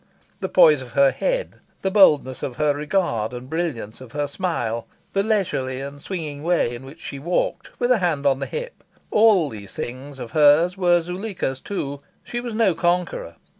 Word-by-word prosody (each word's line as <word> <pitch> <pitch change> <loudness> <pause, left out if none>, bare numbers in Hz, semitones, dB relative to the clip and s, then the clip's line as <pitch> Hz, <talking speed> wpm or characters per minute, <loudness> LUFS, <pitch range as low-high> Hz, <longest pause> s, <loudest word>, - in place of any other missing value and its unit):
The 190 -3 -3
poise 155 -6 +6
of 125 -3 -10
her 140 -1 +5
head, - - -2 0.3
the 190 - +1
boldness 150 -10 +4
of 125 - -4
her 150 +1 +2
regard 145 - -1
and 125 +1 -7
brilliance 140 -9 -3
of 125 -3 -12
her 145 0 0
smile, 140 - -2 0.3
the 195 - +2
leisurely 185 - 0
and 140 +1 -7
swinging 155 -6 -5
way 165 -7 +1
in 120 +2 -8
which 150 +5 -12
she 140 - -7
walked, 170 +6 -2
with 245 0 +2
a 245 - +4
hand 160 -6 0
on 135 -1 +3
the - - -3
hip 485 0 -6 0.3
all 210 -7 +5
these 105 -5 -10
things 135 +3 -6
of 120 - -7
hers 155 +3 +5
were 175 -2 +3
Zuleika's 180 -6 -4
too. 140 -8 -4 0.2
She 240 - -4
was 240 -3 -5
no 215 -5 +3
conqueror. 175 - -1
155 Hz, 185 wpm, -23 LUFS, 135-190 Hz, 0.3 s, poise